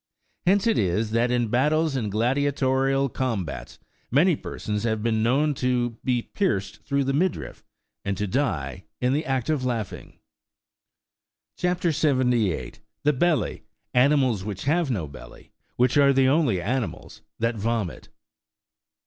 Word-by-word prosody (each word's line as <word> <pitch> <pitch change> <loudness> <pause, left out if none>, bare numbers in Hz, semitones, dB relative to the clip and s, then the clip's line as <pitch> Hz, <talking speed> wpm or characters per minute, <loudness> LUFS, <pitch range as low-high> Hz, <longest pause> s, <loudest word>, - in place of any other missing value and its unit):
Hence 200 +3 +4
it 230 - +3
is, 105 +3 0
that 115 +2 +2
in 120 -2 +1
battles 150 +5 +2
and 110 -6 -2
gladiatorial 135 +3 +1
combats, 115 - -3 0.3
many 160 +7 +4
persons 105 -6 -4
have 110 -1 -1
been 110 -2 +1
known 140 +6 +2
to 125 -2 0
be 125 -2 +1
pierced 175 - -2
through 140 0 0
the 135 +1 -1
midriff, 175 +5 -1 0.4
and 100 -1 -2
to 105 - -1
die 90 - -2
in 125 +1 +1
the 150 +3 0
act 135 -5 -1
of 145 -4 0
laughing.80 115 -5 -4 1.4
CHAP. 180 -1 0
78. 125 - +1 0.2
THE 150 - +3
BELLY: 165 +4 +1 0.3
ANIMALS 130 -5 +3
WHICH 100 -2 -5
HAVE 155 +2 +1
NO 95 - -1
BELLY. 70 - -13 0.2
WHICH 125 +3 +2
ABE 140 -1 +6
THE 135 -1 +4
ONLY 135 - +2
ANIMALS 120 +6 -3 0.2
THAT 115 0 -1
VOMIT. 110 -3 -2
125 Hz, 140 wpm, -25 LUFS, 110-145 Hz, 1.4 s, ABE